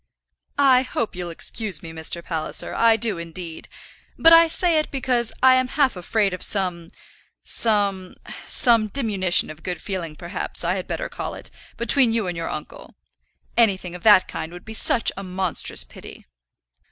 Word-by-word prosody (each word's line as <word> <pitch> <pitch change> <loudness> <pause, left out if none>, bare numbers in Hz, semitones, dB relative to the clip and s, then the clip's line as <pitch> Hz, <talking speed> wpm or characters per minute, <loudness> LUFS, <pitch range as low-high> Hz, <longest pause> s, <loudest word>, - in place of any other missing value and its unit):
"I 265 -3 +5
hope 240 -5 -4
you'll 175 -1 -5
excuse 180 +1 -3
me, 165 - -8
Mr. 160 +1 -5
Palliser, 160 -2 -2
I 230 -1 +4
do, 215 -5 +2
indeed; 170 0 -8 0.5
but 330 0 +6
I 330 0 +8
say 330 0 +1
it 305 - -3
because 250 -4 -1
I 260 0 +7
am 255 0 +2
half 275 -2 +1
afraid 195 +2 0
of 180 - -6
some, 180 -4 0 0.5
some, 200 -4 -1 0.3
some 230 -4 +3
diminution 195 - 0
of 155 0 -13
good 180 0 -5
feeling, 170 -4 -5
perhaps, 170 +2 -2
I 175 +1 0
had 185 -1 -5
better - - -4
call - - -6
it, - - -9 0.3
between 235 0 +3
you 225 -3 0
and 180 -1 -4
your 165 0 -4
uncle. - - -9 0.6
Anything 190 -6 +2
of 180 - -9
that 205 -2 +6
kind 160 - -6
would 175 0 -12
be 220 - -8
such 230 +1 +2
a 195 - -6
monstrous 185 - +1
pity." - - -13
195 Hz, 170 wpm, -22 LUFS, 175-235 Hz, 0.6 s, I